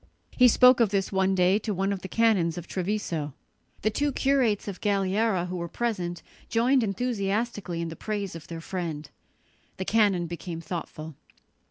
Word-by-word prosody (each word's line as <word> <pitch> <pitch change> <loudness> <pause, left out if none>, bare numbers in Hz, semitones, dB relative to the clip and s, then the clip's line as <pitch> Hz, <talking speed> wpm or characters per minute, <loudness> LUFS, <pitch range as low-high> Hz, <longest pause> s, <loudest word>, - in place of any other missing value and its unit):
He 250 - +6
spoke 250 +1 +6
of 230 -3 +4
this 195 -1 -1
one 190 0 +2
day 185 +2 +4
to 215 -2 -3
one 195 +2 0
of 190 - -5
the - - -6
canons 195 -7 +2
of 175 - -6
Treviso. 175 -7 -3 0.5
The 215 - +2
two 285 +6 0
curates 260 -7 +1
of 195 -3 -6
Galliera 200 -1 +1
who 180 0 -4
were 170 0 -3
present 180 -5 -3 0.3
joined 250 +3 +3
enthusiastically 205 -4 -2
in 170 - -3
the 165 - -7
praise 205 -3 -4
of 165 - -9
their 165 -1 -7
friend. 165 -5 -4 0.7
The 190 - -3
canon 200 -5 +3
became 170 0 -6
thoughtful. 160 -2 -6
195 Hz, 170 wpm, -27 LUFS, 175-220 Hz, 0.7 s, He